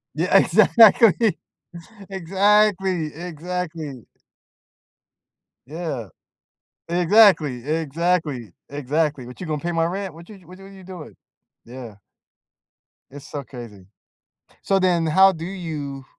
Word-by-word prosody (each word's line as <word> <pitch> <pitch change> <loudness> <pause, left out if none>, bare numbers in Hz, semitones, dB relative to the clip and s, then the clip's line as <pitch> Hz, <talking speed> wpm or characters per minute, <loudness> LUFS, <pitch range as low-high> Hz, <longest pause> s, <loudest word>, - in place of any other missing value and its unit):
Yeah, - - +3
exactly. 225 -1 +5 0.7
Exactly, 190 -2 +1
exactly. 165 -4 -6 1.6
Yeah. 150 - -6 0.8
Exactly. 175 - +3
Exactly. 160 -4 -2 0.2
Exactly, 145 0 -2
"What 125 - -12
you - - -5
gonna 150 -2 -3
pay 175 - -3
my 165 -1 0
rent? 190 0 -4
What 170 +1 -14
you 210 - -12
j - - -22
what 180 +3 -14
w 195 - -15
what 195 - -14
are - - -14
you 190 - -14
doing?" 180 -4 -11 0.5
Yeah. 120 -3 -10 1.2
It's 145 0 -12
so 145 -1 -6
crazy. 115 -7 -12 0.8
So 195 - +1
then 175 -3 +1
how 190 +5 +5
do 165 -2 -8
you 155 -7 -6
165 Hz, 120 wpm, -22 LUFS, 145-190 Hz, 1.6 s, exactly